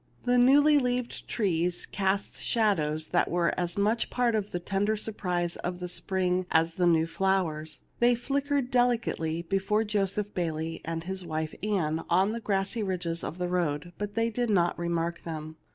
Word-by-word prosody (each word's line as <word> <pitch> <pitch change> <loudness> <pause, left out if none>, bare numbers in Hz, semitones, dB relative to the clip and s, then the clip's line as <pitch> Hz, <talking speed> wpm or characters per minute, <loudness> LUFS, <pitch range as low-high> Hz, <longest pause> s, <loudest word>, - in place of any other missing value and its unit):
The 245 0 +4
newly 290 +4 +6
leaved 250 -2 -2
trees 175 -5 0
cast 195 +1 -1
shad 215 -6 +2
ows 155 +1 -2
that 175 - +2
were 175 0 +1
as 175 0 -2
much 215 +3 +2
a - - -20
part 245 -2 +1
of 210 -2 -1
the 175 - -3
tender 200 +4 0
sur 220 - -3
prise 175 -4 -2
of 180 0 -4
the 180 - -4
spring 180 0 0
as 165 0 +2
the 175 +1 +2
new 165 -1 +4
flowers. 165 -4 -1 0.2
They 240 0 +5
flickered 275 +1 -1
delicately 230 -10 +1
before 195 +4 +1
Joseph 205 -1 -1
Bayley 165 -2 -2
and 165 0 -4
his 190 +1 -4
wife 160 -2 -3
Ann 165 -6 0
on 190 +4 +3
the 230 - -3
grassy 200 +1 -1
ridges 180 -4 -2
of 165 - -5
the 180 0 -1
road, 175 -2 -1
but 205 0 -4
they 230 0 +1
did 240 +1 -1
not 175 -5 +2
remark 170 0 -2
them. 155 -1 -6
185 Hz, 185 wpm, -28 LUFS, 170-215 Hz, 0.2 s, newly